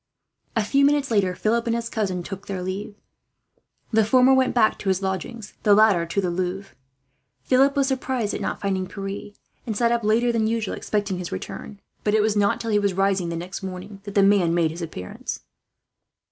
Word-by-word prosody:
A 225 - +2
few 275 +6 +2
minutes 285 -2 +2
later, 190 -4 +2
Philip 230 +4 0
and 230 - +1
his 235 0 -2
cousin 190 -6 -2
took 195 +1 -8
their 190 -2 -4
leave. 195 +3 -5 1.0
The 220 -1 +4
former 255 +4 +5
went 260 -1 +2
back 220 -3 +3
to 195 - -2
his 190 +1 0
lodgings, 195 +3 -4
the 205 -1 +5
latter 205 -6 +4
to 170 - -1
the 180 -3 0
Louvre. 185 +2 -3 0.7
Philip 270 - +3
was 275 -1 +2
surprised 255 -4 -1
at - - -4
not - - -3
finding 190 -2 -1
Pierre, 195 +1 -6 0.3
and 220 -3 -2
sat 235 0 +2
up 235 -1 +1
later 230 +3 +3
than 225 -2 +1
usual, 225 -2 -1
expecting 205 -3 -2
his 180 - -5
return; 200 - -7 0.2
but 210 0 +2
it 215 - +4
was 215 -1 +1
not 200 -1 +2
till 230 - -3
he 210 - +4
was 200 -2 0
rising 195 -2 +1
next 175 +4 -5
morning 190 +1 -7
that 200 - -7
the 200 - +5
man 195 -4 +4
made 165 -2 +2
his 170 +2 -8
appearance. 125 - -6
205 Hz, 200 wpm, -24 LUFS, 185-230 Hz, 1.0 s, former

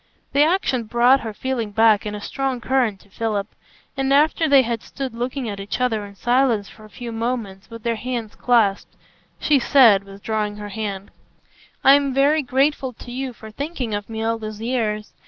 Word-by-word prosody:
The 280 - +4
action 300 -7 +2
brought 240 +4 +4
her 225 - -5
feeling 235 0 -3
back 215 0 +3
in 210 - -4
a 205 - -7
strong 265 +2 -2
current 240 -5 0
to 200 - -23
Philip; 215 -2 -2 0.5
and 270 0 -1
after 310 +3 +3
they 275 -2 +6
had 230 -1 -3
stood 270 -3 -6
looking 245 +2 -3
at 200 -2 -5
each 195 +4 -4
other 230 -4 0
in 200 - -14
silence 240 -2 +1
for 215 - -15
a - - -15
few 240 +1 -7
moments, 225 -4 -4
with 230 -1 -10
their 230 -1 -1
hands 235 -3 -4
clasped, 225 -5 +1 0.4
she 295 -2 +3
said, 235 -7 +5
withdrawing 205 +1 -3
her 205 0 -7
hand: 200 -2 -5 0.7
"I'm 275 -1 +5
very 290 +3 +4
grateful 270 0 0
to 240 - -11
you 260 +1 -4
for 220 -2 -12
thinking 270 -3 -4
of 205 +1 -4
me 220 0 -4
all 225 0 0
those 215 -1 -7
years. 220 -3 -2
230 Hz, 190 wpm, -22 LUFS, 215-265 Hz, 0.7 s, they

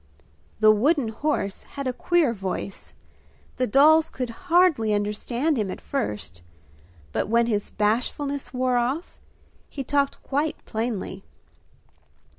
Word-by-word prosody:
The 215 0 +8
wooden 255 +3 +2
horse 220 -4 -2 0.2
had 280 - -3
a 255 - 0
queer 330 -2 +2
voice; 195 -1 -5 0.6
the 255 - +1
dolls 310 +7 +5
could 250 -2 -4 0.2
hardly 325 -12 +4
understand 235 +8 -1
him 205 -3 -1
at - - -5
first, 105 - -4 0.7
but - - -1
when 235 +1 +4
his 210 -3 -1
bashfulness 255 +6 -1
wore 255 -1 +1
off, 260 +8 -2 0.5
he 275 - -5
talked 280 +1 0
quite 290 +3 -1
plainly. 220 -4 -3
250 Hz, 120 wpm, -25 LUFS, 215-285 Hz, 0.7 s, The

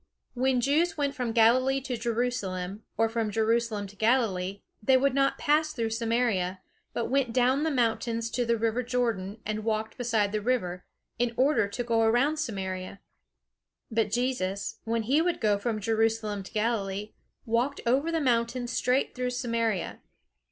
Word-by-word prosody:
When 255 0 +1
Jews 310 +7 +2
went 285 -1 0
from 250 -5 -2
Galilee 250 +4 +4
to 255 -1 -3
Jerusalem, 215 -5 -2 0.2
or 225 +1 +3
from 225 -1 -1
Jerusalem 225 0 0
to 200 +1 -12
Galilee, 200 -4 +1 0.2
they 260 +4 +5
would 275 0 +2
not 275 0 +2
pass 305 0 +2
through 230 -4 -2
Samaria, 225 -5 0 0.3
but 235 - -2
went 270 -3 +2
down 255 +3 +3
the 320 - +1
mountains 230 -3 0
to 245 - 0
the 235 0 +1
river 230 +2 0
Jordan, 230 -5 -1
and 215 0 -3
walked 220 +1 -2
beside 225 -4 +1
the 215 0 -1
river, 190 -7 -1 0.3
in 240 -1 0
order 265 -5 +3
to 200 +5 -4
go 230 -1 +1
around 245 +7 +3
Samaria. 190 -8 -4 0.9
But 225 -1 +1
Jesus, 215 -5 -2
when 230 0 0
he 275 +8 +3
would 350 +1 0
go 210 -2 +2
from 220 0 -2
Jerusalem 220 -1 0
to 190 - -11
Galilee, 210 -2 -1 0.3
walked 240 +5 0
over 275 +7 +2
the 330 - +1
mountains 240 -2 0
straight 250 +3 +1
through 250 0 -2
Samaria. 230 -6 -1
230 Hz, 160 wpm, -28 LUFS, 215-255 Hz, 0.9 s, they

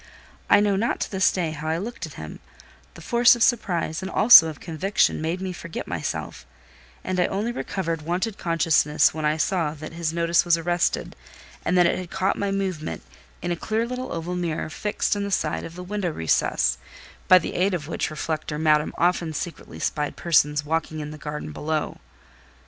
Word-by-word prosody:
I 205 - +6
know 205 -1 +2
not 225 +5 0
to - - -2
this 190 -2 +3
day 170 -4 -2
how 155 0 -6
I 160 +1 0
looked 200 -2 -5
at 150 - -13
him: 80 0 -8 0.6
the 170 - -11
force 240 +4 +5
of 235 - +1
surprise, 180 -9 0
and 190 - -5
also 210 -6 +8
of 155 -2 -7
conviction, 175 +1 0
made 165 +3 -2
me 190 -1 -4
forget 170 -1 -7
myself; - - -4 0.6
and 185 -1 -2
I 180 - +3
only 210 +5 -2
recovered 165 -9 -3
wonted 180 +7 -2
consciousness 165 -3 +3
when 155 0 -3
I 150 +1 +1
saw 160 -3 0
that 155 +1 -9
his 165 -1 -2
notice 170 0 +2
was 170 -1 +3
arrested, 175 +1 -1 0.5
and 180 - +1
that 175 - +6
it 170 - +1
had 180 -2 -7
caught 190 +2 0
my 200 - -2
movement 190 -5 -3 0.4
in 175 - -1
a - - +1
clear 220 +6 -1
little 250 +1 -5
oval 170 +2 -4
mirror 170 -3 -3
fixed 210 +2 -1
in 205 - -2
the 200 - -3
side 160 -5 -1
of 165 - -9
the 180 - -7
window 195 -1 -2
recess—by 65 - +1
the 180 - -2
aid 185 +1 +1
of 150 -4 -5
which 165 - -2
reflector 155 0 -3
Madame 150 -1 +2
often 175 -2 +1
secretly 150 - -6
spied 150 - -2
persons 150 -3 +2
walking 160 0 -2
in 150 0 -5
the 155 - -10
garden 150 - -6
below. 155 - -3
170 Hz, 195 wpm, -24 LUFS, 155-190 Hz, 0.6 s, also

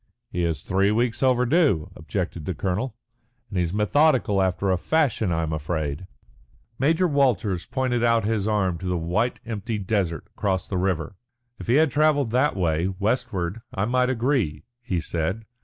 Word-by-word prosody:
"He 90 - -1
is 80 -4 -1
three 95 +2 +2
weeks 115 +2 0
overdue," 130 - +3
objected 85 0 -4
the 90 - -3
colonel, 100 - -2 0.6
"and 95 - -1
he's 85 -2 0
methodical 105 - +3
after 95 +1 +1
a 90 - +2
fashion. 130 - +1
I 80 -1 0
am 80 0 -2
afraid." 80 +1 -3 0.7
Major 165 +6 +3
Walters 120 - +1
pointed 125 -3 0
out 115 -2 +3
his 110 -2 0
arm 95 -5 +1
to 95 - -5
the 90 -1 0
white 90 +9 -1
empty 110 -1 -3
desert 95 -6 -1
across 95 -2 -1
the 95 - -2
river. 90 -2 -1 0.4
"If - - -8
he 120 - +3
had 155 -1 +4
travelled 145 -4 +2
that 130 +5 +2
way, 85 -2 +1
westward, 100 -1 -2
I 100 - 0
might 125 +2 +2
agree," 120 - 0 0.2
he 95 -8 -2
said. 85 +7 -2
100 Hz, 165 wpm, -24 LUFS, 90-125 Hz, 0.7 s, had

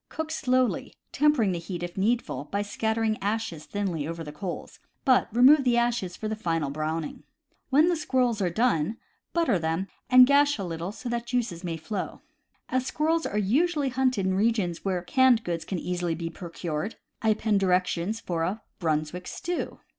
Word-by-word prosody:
Cook 320 0 -4
slowly, 255 -5 0 0.2
tempering 290 -9 +3
the 175 - -2
heat, 175 +1 -6
if 175 0 -5
needful, 195 - 0
by 200 +5 -2
scattering 220 +1 -1
ashes 205 -7 -2
thinly 180 -8 -2
over 165 0 -5
the 150 - -7
coals; 175 +4 -6 0.3
but 260 -2 +4
remove 265 +6 +6
the 245 -2 +3
ashes 235 -7 0
for - - -7
a 215 0 -1
final 165 -8 -1
browning. 155 +1 -3 0.5
When 295 +5 +5
the 350 - +3
squirrels 250 -8 +1
are 180 - +2
done, 215 -1 +1 0.3
butter 335 - +2
them, 165 +4 -1 0.2
and 255 -1 +9
gash 285 +2 +4
a 200 - -4
little 170 0 -4
that 235 +5 -8
the 240 - +1
juices 235 -7 -2
may 170 -2 -3
flow. 185 +4 -5 0.5
As 255 0 -1
squirrels 320 +2 +1
are 210 - -3
usually 285 - +2
hunted 255 -5 +1
in 190 - +1
regions 200 -4 +1
where 185 -3 -1
canned 255 +2 +4
goods 170 -2 -3
can 190 - -3
easily 175 -1 -2
be 165 0 -4
procured, 170 +1 -4 0.3
I 220 - +2
append 210 -1 +2
direc 180 -1 +3
tions 185 +6 -2
for 170 -7 -3
a 190 +7 -2 0.2
Brunswick 160 +1 -1
Stew. 350 0 -4
205 Hz, 180 wpm, -27 LUFS, 170-250 Hz, 0.5 s, and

